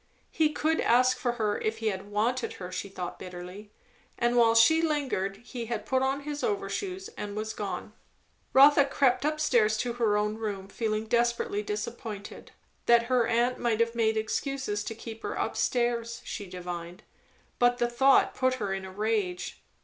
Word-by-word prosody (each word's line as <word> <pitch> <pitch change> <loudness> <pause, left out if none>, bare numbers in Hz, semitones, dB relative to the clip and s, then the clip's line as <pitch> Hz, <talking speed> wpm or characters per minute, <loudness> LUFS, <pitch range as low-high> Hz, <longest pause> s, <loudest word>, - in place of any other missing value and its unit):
He 310 -2 +2
could 315 +1 0
ask 255 +2 +4
for 245 -2 0
her 215 -3 -1
if 220 +1 -2
he 225 -1 0
had 195 0 -5
wanted 230 +5 0
her, 180 -1 -8
she 185 +2 -4
thought 180 -2 -6
bitterly; 185 +3 -9 0.5
and 240 0 +1
while 230 -1 +5
she 320 +8 +6
lingered 275 - -1
he 240 -2 -6
had 230 -2 -3
put 260 0 +1
on 270 +1 0
his 295 +1 -5
overshoes 395 -3 -2
and 205 -1 -7
was 215 +1 -3
gone. 205 -3 -5 0.6
Rotha 285 +1 +7
crept 275 -1 +2
up 305 0 -1
stairs 220 -8 +3
to 240 +1 -2
her 225 -3 +2
own 210 +1 -1
room, 200 -3 -4
feeling 215 0 -2
desperately 235 -2 +1
disappointed. 210 0 -6 0.4
That 235 0 +6
her 240 -2 +3
aunt 240 +2 +1
might 230 -2 0
have 230 0 +2
made 220 -1 +1
excuses 220 -1 -2
to 225 - -4
keep 225 0 -9
her - - -4
up - - -1
stairs, 235 -1 0
she 205 - -5
divined; 175 -1 -7 0.6
but 245 0 +4
the 240 - +1
thought 265 +3 +4
put 255 0 +1
her 205 -6 -2
in 195 0 -4
a 190 - -8
rage. 205 -3 -2
230 Hz, 180 wpm, -28 LUFS, 210-255 Hz, 0.6 s, Rotha